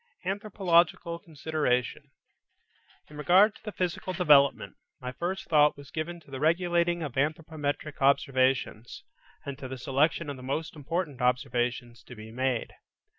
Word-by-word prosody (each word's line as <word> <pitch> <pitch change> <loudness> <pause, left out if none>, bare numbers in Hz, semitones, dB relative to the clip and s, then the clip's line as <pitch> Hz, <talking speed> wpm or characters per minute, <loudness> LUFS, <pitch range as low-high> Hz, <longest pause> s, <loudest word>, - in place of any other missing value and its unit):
ANTHROPOLOGICAL 180 -4 +1
CONSIDERATION 150 -6 -2 1.0
In 150 - -13
regard 185 +7 +5
to 215 - -8
physical 185 0 -3
development, 150 -6 +4 0.2
my 125 0 -5
first 175 +8 -4
thought 150 -3 +4
was 140 0 -13
given 170 +2 -4
to 140 - -19
the 135 - -5
regulating 170 +2 +1
of 145 -5 -5
anthropometric 150 0 -2
observations, 130 -4 +1 0.4
and 140 -1 -6
to 130 - -6
the 130 +1 -6
selection 145 +6 +1
of 140 -2 -5
the - - -11
most 140 +6 -3
important 150 -2 -3
observations 125 -1 -1
to 125 - -12
be 110 0 -10
made. 130 0 -1
150 Hz, 135 wpm, -28 LUFS, 130-170 Hz, 1.0 s, regard